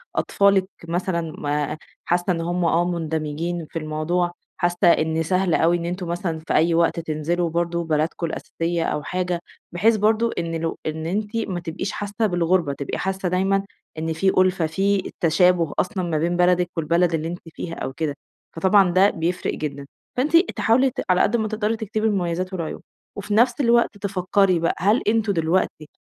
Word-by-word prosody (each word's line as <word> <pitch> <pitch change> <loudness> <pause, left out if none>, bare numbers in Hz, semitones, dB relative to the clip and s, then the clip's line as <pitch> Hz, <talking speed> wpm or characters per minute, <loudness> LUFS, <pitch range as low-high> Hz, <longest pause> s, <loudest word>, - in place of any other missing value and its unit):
أطفالِك 195 -1 +2 0.2
مثلًا 175 0 -1 0.2
ما 145 +1 -1 0.3
حاسّة 175 0 +1
إن 165 -2 -1
هم 175 +1 -1
آه 170 +1 +2
مُندمجين 165 0 -3
في 165 - -4
الموضوع، 160 +3 -1 0.3
حاسّة 175 +1 +1
إن 160 0 +1
سهل 185 +1 +1
أوي 170 +3 +3
إن 170 - -5
أنتم 180 +1 -4
مثلًا 170 -1 -2
في 160 - -4
أي 165 +2 +3
وقت 170 0 +2
تنزلوا 165 +2 -1
برضه 170 +1 -1
بلدكم 160 +1 -1
الأساسية 165 +1 -2
أو 150 - -2
حاجة 180 +1 -2 0.3
بحيث 215 +6 +3
برضه 220 +2 +2
إن 165 -1 -3
لو 165 0 -2
إن 160 0 -3
أنتِ 205 +6 -2
ما 195 -5 -2
تبقيش 170 +3 -4
حاسّة 205 +2 -2
بالغُربة، 175 -4 +1
تبقي 140 0 -4
حاسّة 190 -1 -2
دايمًا 195 +2 +1 0.3
إن 160 +1 -2
في 190 +4 +2
أُلفَة، 185 -2 +3
في 195 +5 +1
التشابه 170 -1 +2
أصلًا 185 +1 -1
ما 170 -3 -1
بين 170 +3 0
بلدِك 180 0 +3
والبلد 170 +2 +2
اللي 160 0 -1
أنتِ 175 +1 -5
فيها 165 -1 -6
أو 130 - -5
كده، 150 0 -2 0.4
فطبعًا 190 +2 +4
ده 190 +3 +5
بيفرق 175 +1 -2
جدًا. 140 -2 -5 0.3
فأنتِ 300 +6 +4
تحاولي 260 - +2 0.2
على 180 0 +4
قد 225 - +2
ما 220 -1 -1
تقدري 215 +1 -1
تكتبي 220 0 -2
المميزات 185 -2 -1
والعيوب 165 -4 -4 0.4
وفي 205 +1 -4
نفس 240 +4 +3
الوقت 235 -4 +3
تفكّري 190 -1 +1
بقى، 165 - 0
هل 210 +8 +2
أنتم 220 -1 +2
دلوقتي 165 -2 0
175 Hz, 175 wpm, -23 LUFS, 165-195 Hz, 0.4 s, ده